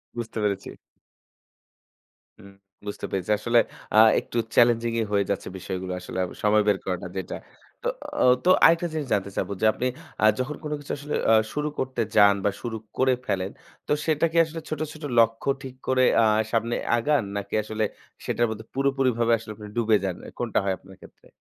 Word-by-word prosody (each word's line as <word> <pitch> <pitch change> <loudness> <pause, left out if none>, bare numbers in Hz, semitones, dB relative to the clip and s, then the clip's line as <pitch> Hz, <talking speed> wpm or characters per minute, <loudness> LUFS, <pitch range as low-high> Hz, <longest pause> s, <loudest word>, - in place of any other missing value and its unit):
বুঝতে 120 -1 -5
পেরেছি। 100 -2 -1 1.7
হুম 100 - -14 0.4
বুঝতে 100 - -5
পেরেছি। 95 0 -3
আসলে 120 +2 +2 0.4
আ - - +5 0.2
একটু 120 - -5 0.2
চ্যালেঞ্জিংই 115 -1 +3
হয়ে 100 -1 +3
যাচ্ছে 100 - -2
বিষয়গুলো 95 0 -5
আসলে 90 - -7
আব 90 - -6
সময় 105 0 +4
বের 100 -2 +3
করাটা 90 -1 -3
যেটা। 95 - -4 0.5
তো - - -1 0.3
ও - - +4 0.2
তো 180 - +5
আরেকটা 165 +1 +5
জিনিস 155 -3 -3
জানতে 100 0 0
চাবো - - -2
যে - - +3
আপনি 125 - -3 0.3
অ্যা 110 - +5
যখন 130 +4 -3
কোন 150 - -4
কিছু 145 - -6
আসলে 145 +1 -5
অ্যা 115 - +6 0.2
শুরু 150 0 -1
করতে 130 -2 -2 0.2
যান 100 -1 +7
বা 100 - +3
শুরু 115 -2 -3 0.2
করে 130 0 +4
ফেলেন, 95 0 -1 0.4
তো - - 0
সেটা 155 0 +2
কি - - -4
আসলে 165 +1 -7
ছোট, 155 - -4
ছোট 155 - -13 0.2
লক্ষ্য 115 +2 +3
ঠিক 130 -2 -8
করে 130 0 +3
অ্যা 115 - +5 0.3
সামনে 115 0 +1 0.2
আগান, 145 +3 +2
নাকি 100 0 -4
আসলে 110 +1 -2 0.4
সেটার 120 - +1
মধ্যে 110 0 -6
পুরোপুরিভাবে 130 -4 +1
আসলে 110 -1 -9
আপনি 105 0 -9
ডুবে 115 -2 +3
যান। 95 -2 -2
অ্যা - - -9
কোনটা 120 -3 0
হয় 95 -1 +1
আপনার 95 +1 -16
ক্ষেত্রে? - - -17
115 Hz, 185 wpm, -25 LUFS, 100-130 Hz, 1.7 s, যান